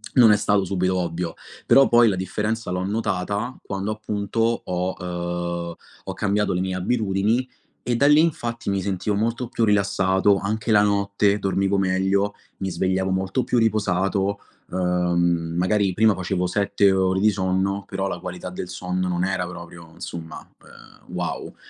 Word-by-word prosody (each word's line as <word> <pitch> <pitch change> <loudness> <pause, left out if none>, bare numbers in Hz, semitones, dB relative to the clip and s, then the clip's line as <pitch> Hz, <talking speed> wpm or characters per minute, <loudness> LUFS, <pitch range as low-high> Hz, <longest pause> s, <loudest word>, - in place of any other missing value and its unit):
non 120 -5 +7
è - - +6
stato 105 -1 +1
subito 95 0 0
ovvio. 85 -1 -3 0.3
Però 135 0 +6
poi 120 -1 +5
la 100 - 0
differenza 105 +4 -2
l'ho 90 0 -1
notata 105 +3 -2
quando 100 +2 -3
appunto 105 0 -4 0.3
ho 90 +1 -2 0.7
uhm, 85 - -8 0.3
ho - - -5
cambiato 105 0 0
le 90 - -1
mie 95 0 -2
abitudini 105 +4 0 0.4
e 120 - 0
da 140 +4 +3
lì 150 +1 +6
infatti 120 -9 -1
mi 100 -1 0
sentivo 100 +2 -1
molto 115 +4 -1
più 115 - -1
rilassato, 100 -1 +3
anche 105 +3 -2
la 105 -1 +6
notte 100 0 +2
dormivo 95 0 +1
meglio, 95 +2 +1 0.2
mi 95 - -3
svegliavo 95 +1 0
molto 95 +6 0
più 125 - 0
riposato, 100 -2 +1 0.3
uhm, 85 -2 0
magari 95 +1 +2
prima 110 +2 +4
facevo 90 0 -2
7 100 +1 +2
ore 95 0 +2
di 110 - +5
sonno, 95 0 -1
però 95 0 -2
la - - -4
qualità 90 0 -6
del 90 0 -6
sonno 90 +1 -3
non 90 -1 -1
era 95 -1 -1
proprio 85 -1 -10
insomma, 80 -1 -8 0.6
uhm, - - -13
wow. - - -4
95 Hz, 160 wpm, -23 LUFS, 90-105 Hz, 0.7 s, non